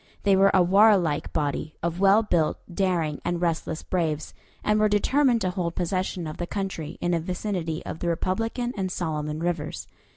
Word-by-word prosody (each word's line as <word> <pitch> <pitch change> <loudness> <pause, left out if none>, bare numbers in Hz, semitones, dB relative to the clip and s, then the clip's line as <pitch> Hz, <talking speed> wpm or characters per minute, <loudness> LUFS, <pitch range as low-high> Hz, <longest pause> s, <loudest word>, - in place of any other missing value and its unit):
They 200 -1 +4
were 195 +1 +5
a 185 - +5
warlike 190 -5 +4
body 150 0 -2
of 170 +1 -2
well 200 +3 +5
built, 170 -7 +1 0.2
daring, 170 -5 0
and 175 0 -1
restless 165 -2 -2
braves, 160 -4 -2 0.3
and 210 0 +2
were 215 0 +4
determined 245 +4 +3
to 185 - 0
hold 175 -3 -3
possession 185 0 -2
of 155 - -6
the 175 - -4
country 190 -7 -4
in 175 - 0
the 170 - +2
vicinity 175 -1 -3
of 160 - -6
the 175 - -3
Republican 225 +8 -1
and 190 -3 -2
Solomon 155 -4 -3
rivers. 165 -3 -3
175 Hz, 175 wpm, -25 LUFS, 160-195 Hz, 0.3 s, were